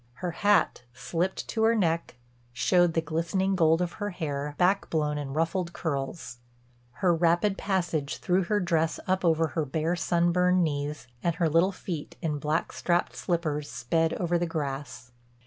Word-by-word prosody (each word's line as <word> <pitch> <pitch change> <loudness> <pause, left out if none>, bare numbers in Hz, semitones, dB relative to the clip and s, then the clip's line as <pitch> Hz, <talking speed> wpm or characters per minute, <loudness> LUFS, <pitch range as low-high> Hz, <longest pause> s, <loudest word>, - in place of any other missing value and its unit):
Her 180 +7 -4
hat, 205 -2 +2
slipped 175 +7 -2
to 225 - -1
her 225 +1 +4
neck, 170 - 0 0.3
showed 175 +6 +2
the 165 - +3
glistening 170 +5 0
gold 165 -1 +3
of 175 - -3
her 205 - -1
hair 145 -5 -4
back 190 +2 +2
blown 150 -2 0
in 135 -2 -5
ruffled 170 +3 -1
curls; 135 -4 -4 0.7
her 175 - +5
rapid 170 +4 +2
passage 175 -8 -1
threw 185 +1 +1
her 205 +4 +1
dress 165 -3 0
up 185 0 0
over 165 -1 +3
her 160 - -1
bare, 160 +4 -1
sunburned 175 +2 +2
knees, 145 -4 -2 0.2
and 170 -1 0
her 170 -1 +1
little 165 +5 +3
feet 175 -5 -6
in 155 -4 -2
black 150 +3 -1
strapped 175 0 0
slippers 155 -4 -2
sped 160 +6 0
over 175 -1 0
the 175 - 0
grass. 140 -4 -5
170 Hz, 165 wpm, -27 LUFS, 155-180 Hz, 0.7 s, her